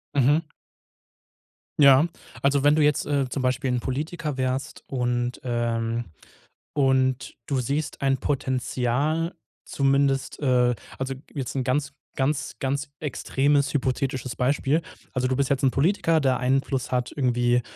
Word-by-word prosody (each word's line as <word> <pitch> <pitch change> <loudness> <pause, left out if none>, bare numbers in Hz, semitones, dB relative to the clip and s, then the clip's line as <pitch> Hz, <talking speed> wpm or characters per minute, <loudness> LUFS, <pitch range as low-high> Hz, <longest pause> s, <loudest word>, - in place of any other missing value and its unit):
Mhm. 145 +4 +4 1.4
Ja. 140 +1 +7 0.4
Also, 140 0 +2
wenn 145 +1 +5
du 155 - +3
jetzt, 150 -1 +2
äh, 140 -2 0
zum 135 - -3
Beispiel 130 +1 0
'n 125 - +1
Politiker 150 +3 -3
wärst 130 +1 -2
und 120 -1 -1
ähm, 120 -1 -1 0.7
und 130 -3 +1
du 135 -3 0
siehst 140 +5 -2
ein 135 -1 +2
Potenzial 135 +4 -1 0.3
zumindest 135 -1 +1
äh, 125 -3 +3 0.2
also 135 0 -2 0.2
jetzt 135 -4 -4
'n 130 - 0
ganz 140 +2 0 0.2
ganz 135 +1 -1
ganz 140 +1 -2
extremes 145 -1 +1
hypothetisches 130 -2 -1
Beispiel. 140 +4 +1 0.3
Also 130 -1 0
du 130 - +1
bist 140 0 +1
jetzt 140 -1 0
'n 135 - +4
Politiker, 165 +2 +2
der 130 -2 +2
Einfluss 135 0 0
hat 125 -1 0
irgendwie, 120 -2 +2
135 Hz, 135 wpm, -25 LUFS, 125-140 Hz, 1.4 s, Ja